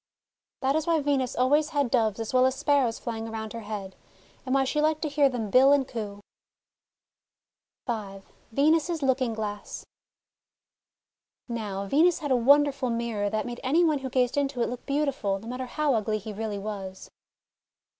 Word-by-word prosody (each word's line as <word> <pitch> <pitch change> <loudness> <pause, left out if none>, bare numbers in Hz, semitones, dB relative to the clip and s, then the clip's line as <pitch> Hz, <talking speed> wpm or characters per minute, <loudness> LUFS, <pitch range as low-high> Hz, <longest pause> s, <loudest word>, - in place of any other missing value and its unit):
That 270 +1 +1
is 315 0 -1
why 330 -1 +3
Venus 275 -3 0
always 290 +5 +3
had 285 -6 0
Doves 220 -4 +1
as 225 +1 -4
well 255 0 +5
as 260 - -1
Sparrows 270 -5 +1
flying 225 -2 -5
around 220 -1 -6
her 230 - -5
head, 205 -3 -6 0.5
and 255 - +1
why 270 - +4
she 295 +3 0
liked 310 +1 +1
to 305 - -1
hear 285 -1 +3
them 225 -5 -4
bill 265 +4 +6
and 280 -2 +3
coo. 205 -5 -6 1.7
V 205 -5 -4 0.3
VENUS'S 315 +4 +2
LOOKING 260 -3 +1
GLASS 210 -1 -5 1.6
Now, 210 -5 -4
Venus 320 - +3
had 290 -3 -4
a - - +5
wonderful 275 +1 +4
mirror 230 -3 -1
that 215 +1 -2
made 240 -1 -6
any 300 +7 +3
one 310 -4 +2
who 265 -1 -5
gazed 250 +1 +1
into 275 -4 0
it - - -1
look 245 0 -7
beautiful, 275 -9 0
no 215 +3 -11
matter 250 +1 -4
how 295 +2 0
ugly 215 -1 0
he 215 +1 -7
really 210 0 -4
was. 195 -2 -7
250 Hz, 175 wpm, -27 LUFS, 220-285 Hz, 1.7 s, bill